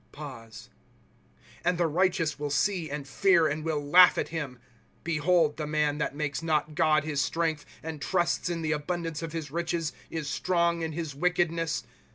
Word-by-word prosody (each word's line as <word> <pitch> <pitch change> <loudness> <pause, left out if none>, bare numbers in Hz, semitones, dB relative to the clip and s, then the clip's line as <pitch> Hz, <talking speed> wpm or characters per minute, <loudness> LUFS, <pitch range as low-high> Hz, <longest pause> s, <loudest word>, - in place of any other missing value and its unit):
* 130 -7 -14
And 180 0 +1
the 175 - +2
righteous 165 -2 +1
will 145 0 -2
see, 165 +3 0
and 140 -1 -5
fear. 175 +2 +4
And 155 +1 -2
will 160 -2 -1
laugh 180 +5 +7
at - - -1
him: 150 -6 -4 0.2
' - - -35
Behold 165 -1 +2
the 155 -1 -3
man, 150 -1 0
That 150 - -2
makes 150 0 -2
not 155 -2 0
God 155 -2 +3
his 150 -2 -1
strength, 160 -1 -1 0.2
And 160 -2 -6
trusts 175 +2 0
In 170 -1 -3
the 155 - 0
abundance 165 +1 -2
of 165 -1 -5
his 160 -4 -4
riclies. 170 -1 -1 0.2
Is 160 -3 -4
strong 170 +2 +1
in 160 -1 -3
his 160 -2 -4
wickedness. 165 0 0
160 Hz, 180 wpm, -28 LUFS, 150-170 Hz, 0.2 s, laugh